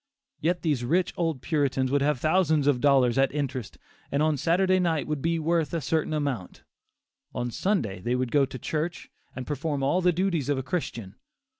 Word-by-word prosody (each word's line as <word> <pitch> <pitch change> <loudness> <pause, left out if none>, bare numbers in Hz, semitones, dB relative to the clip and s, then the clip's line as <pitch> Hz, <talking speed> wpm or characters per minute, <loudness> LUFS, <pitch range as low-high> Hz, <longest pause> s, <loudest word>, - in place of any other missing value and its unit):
Yet 175 +3 0
these 145 -7 0
rich 175 +8 +1
old 165 -7 -2
Puritans 135 -3 0
would 140 0 +2
have 145 -2 +1
thousands 155 -1 +2
of 140 -4 +2
dollars 135 -3 +4
at 135 - +3
interest, 135 -6 -4 0.3
and 140 +2 +1
on 155 -1 +2
Saturday 185 +6 +2
night 165 -5 0
would 150 -2 -3
be 165 +2 +1
worth 165 -1 0
a - - 0
certain 155 +2 -1
amount; 140 -11 -3 0.7
on 120 0 -2
Sunday 115 - -1
they 120 +5 0
would 125 -1 -1
go 145 -1 +4
to 130 - -7
church 160 +7 -4 0.2
and 130 0 -5
perform 145 -1 -2
all 175 +7 +2
the 180 0 +4
duties 175 -5 -1
of 145 - +1
a 130 - -2
Christian. 120 - -4
145 Hz, 190 wpm, -26 LUFS, 130-165 Hz, 0.7 s, dollars